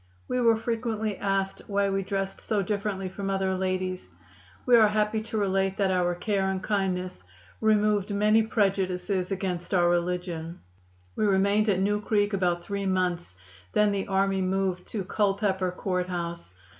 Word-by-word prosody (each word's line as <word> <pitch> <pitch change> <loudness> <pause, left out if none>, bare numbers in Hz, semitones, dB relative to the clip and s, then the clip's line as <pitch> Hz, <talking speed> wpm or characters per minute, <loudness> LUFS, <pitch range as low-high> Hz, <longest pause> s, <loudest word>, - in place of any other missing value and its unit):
We 250 0 0
were 230 -2 +4
frequently 225 -2 -2
asked 195 -1 -1
why 200 -1 +1
we 195 0 0
dressed 195 0 -3
so 210 -3 0
differently 200 -1 -2
from 195 +1 -5
other 190 -1 0
ladies. 185 - -2 0.6
We 245 - +6
are 220 -2 +7
happy 210 +1 0
to 220 0 -5
relate 195 -1 +1
that 195 -2 +2
our 175 -1 +1
care 195 +1 0
and 190 -1 -3
kindness 185 - -1 0.4
removed 210 -2 +2
many 210 +2 +4
prejudices 195 -3 0
against 190 -1 -2
our 175 -1 +4
religion. 175 -1 -2 0.5
We 215 - +1
remained 200 +2 +3
at 190 -2 +2
New 205 +1 +1
Creek 205 -1 +1
about 175 -3 0
three 200 0 -3
months; 180 - -1 0.4
then 210 0 +4
the 200 -1 -2
army 195 0 +1
moved 185 -1 -1
to 210 -4 -3
Culpepper 195 -1 0
Court 180 0 -2
House. 170 - -4
195 Hz, 155 wpm, -27 LUFS, 185-210 Hz, 0.6 s, are